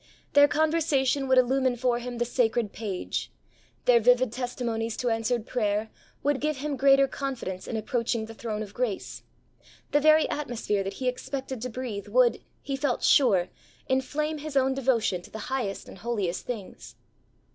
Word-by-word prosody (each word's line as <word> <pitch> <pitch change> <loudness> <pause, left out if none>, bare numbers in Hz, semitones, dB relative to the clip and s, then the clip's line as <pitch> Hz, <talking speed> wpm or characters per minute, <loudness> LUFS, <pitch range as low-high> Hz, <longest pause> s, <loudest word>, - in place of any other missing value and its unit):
Their 285 0 +7
conversation 295 -4 +1
would 260 0 +4
illumine 255 0 +3
for 245 0 +1
him 245 0 -6
the 240 - 0
sacred 235 -3 0
page; 200 -5 -4 0.5
their 245 -1 +6
vivid 245 +1 +4
testimonies 235 -2 -3
to 245 -2 0
answered 225 0 0
prayer 215 -3 -1 0.3
would 285 -1 +1
give 305 -1 0
him 290 +1 -3
greater 275 +1 +5
confidence 255 -11 -5
in 225 - -2
approaching 230 +1 -1
the 225 - -10
Throne 220 -1 -4
of 205 -1 -11
Grace; 235 -5 -3 0.7
the 290 - +4
very 310 +1 +5
atmosphere 235 -8 -2
that 195 +1 -4
he 255 +5 -4
expected 260 0 -4
to 250 - -3
breathe 225 -5 -5
would, 240 +2 +3 0.2
he 275 - -2
felt 270 -2 -1
sure, 195 -10 +4 0.4
inflame 300 +4 -1
his 295 -1 -3
own 265 0 +3
devotion 235 -8 +1
to - - -14
the 220 +4 -6
highest 210 -7 -2
and - - -11
holiest 205 -5 -2
things. 220 -6 -7
245 Hz, 165 wpm, -27 LUFS, 220-270 Hz, 0.7 s, Their